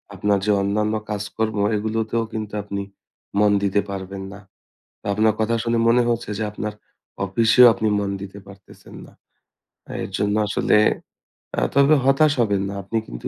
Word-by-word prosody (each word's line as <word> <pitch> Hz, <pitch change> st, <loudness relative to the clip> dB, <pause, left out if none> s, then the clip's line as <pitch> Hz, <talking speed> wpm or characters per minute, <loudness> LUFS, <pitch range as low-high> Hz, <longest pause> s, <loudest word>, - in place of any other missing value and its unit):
আপনার 100 Hz, +1 st, +1 dB
যে 105 Hz, -, +2 dB
অন্যান্য 105 Hz, +2 st, 0 dB, 0.2 s
কাজ-কর্ম 105 Hz, +1 st, -3 dB, 0.2 s
এগুলোতেও 110 Hz, +2 st, -1 dB
কিন্তু 110 Hz, -1 st, -5 dB
আপনি 100 Hz, 0 st, -4 dB, 0.6 s
মন 105 Hz, -1 st, +4 dB
দিতে 100 Hz, +1 st, +2 dB
পারবেন 95 Hz, 0 st, -6 dB
না। 100 Hz, -, -10 dB, 0.6 s
তা -, -, -27 dB
আপনার 110 Hz, +1 st, +3 dB
কথা 115 Hz, +1 st, +1 dB
শুনে 115 Hz, 0 st, 0 dB
মনে 120 Hz, +1 st, +5 dB
হচ্ছে 120 Hz, -1 st, -2 dB
যে -, -, -1 dB
আপনার 105 Hz, 0 st, -5 dB, 0.5 s
অফিসেও 115 Hz, +5 st, +5 dB
আপনি 110 Hz, -, -1 dB
মন 100 Hz, -1 st, -2 dB
দিতে 100 Hz, +1 st, -8 dB
পারতেছেন 100 Hz, -1 st, -15 dB
না। -, -, -17 dB, 0.8 s
আ -, -, -7 dB
এর -, -, -6 dB
জন্য 105 Hz, 0 st, 0 dB
আসলে 105 Hz, -, +2 dB, 0.8 s
আ -, -, +3 dB, 0.2 s
তবে 140 Hz, +2 st, +6 dB
হতাশ 140 Hz, +3 st, +4 dB
হবেন 100 Hz, -4 st, +1 dB
না। 100 Hz, -, -5 dB
আপনি 105 Hz, +4 st, -3 dB
কিন্তু -, -, -6 dB
105 Hz, 165 wpm, -22 LUFS, 100-115 Hz, 0.8 s, তবে